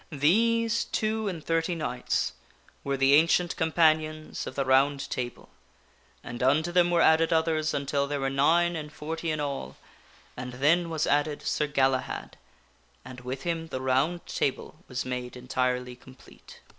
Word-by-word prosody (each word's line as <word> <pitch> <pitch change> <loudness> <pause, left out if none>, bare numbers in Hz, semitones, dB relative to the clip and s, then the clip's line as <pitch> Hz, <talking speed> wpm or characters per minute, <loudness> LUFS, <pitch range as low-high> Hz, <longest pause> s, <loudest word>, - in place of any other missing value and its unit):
These 230 +10 +2
two 220 0 -1
and 170 -6 -5
thirty 165 +1 0
knights 155 -6 -2 0.5
were 140 0 -1
the 135 +1 +4
Ancient 165 +3 +4
Companions 155 -1 +1
of - - -7
the 140 - -1
Round 135 +1 +2
Table, 120 -1 -5 0.7
and 120 0 -7
unto 150 +6 +2
them 175 0 +4
were 170 -1 +3
added 160 +1 +4
others 160 -1 +1
until 140 0 -1
there 145 0 -2
were 135 - -1
nine 170 +5 +3
and 150 -2 -6
forty 160 +2 -5
in 155 -1 -1
all, 140 - -4 0.6
and 125 0 -6
then 160 +7 +2
was 160 -1 -1
added 145 0 0
Sir 150 - 0
Galahad, 135 -3 -1 0.7
and 130 0 -9
with 130 +2 -6
him 165 -1 -2
the 130 - -5
Round 135 +7 0
Table 140 +3 -3
was 125 0 -4
made 125 -1 -5
entirely 125 0 -2
complete. 130 +1 -16
150 Hz, 155 wpm, -27 LUFS, 130-165 Hz, 0.7 s, the